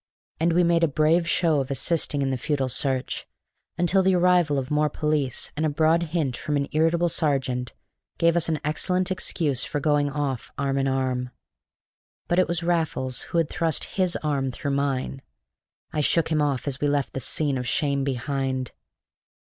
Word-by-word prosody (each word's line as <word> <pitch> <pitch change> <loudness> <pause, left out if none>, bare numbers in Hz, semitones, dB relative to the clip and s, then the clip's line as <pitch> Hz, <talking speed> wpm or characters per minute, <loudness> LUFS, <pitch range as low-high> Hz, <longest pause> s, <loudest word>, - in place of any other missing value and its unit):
And 165 +1 +2
we 175 +1 +4
made 170 0 +3
a - - +5
brave 160 +3 +2
show 160 -5 +2
of 135 - -5
assisting 140 +1 0
in 135 - 0
the - - 0
futile 135 0 -1
search, 130 0 -2 0.5
until 175 +3 +3
the 190 0 +3
arrival 175 -4 +3
of 135 +1 -3
more 150 0 +2
police, 150 -4 -1
and 155 - -2
a 155 - +2
broad 160 +3 +3
hint 150 -7 -1
from 150 -1 -2
an 140 0 -1
irritable 165 +3 +2
sergeant, 135 -6 0 0.4
gave 170 0 +3
us 170 -1 +1
an 155 -2 0
excellent 180 +4 0
excuse 160 -7 0
for 145 - -3
going 145 0 +2
off 140 -4 -3
arm 140 0 0
in 135 - +1
arm. 130 -1 -1 1.0
But 175 - +2
it 185 - +3
was 170 0 -1
Raffles 160 -7 0
who - - -1
had 165 -2 +3
thrust 160 0 -1
his 185 -2 +1
arm 140 -3 0
through 140 +3 -4
mine. 135 -1 -1 0.7
I 155 - +1
shook 160 +3 +2
him 155 -2 +1
off 145 -2 -1
as 135 -1 -3
we 145 - +2
left 145 -1 0
the - - -3
scene 140 +1 0
of 125 - -4
shame 140 +1 0
behind. 135 -1 -2
150 Hz, 185 wpm, -25 LUFS, 135-165 Hz, 1.0 s, a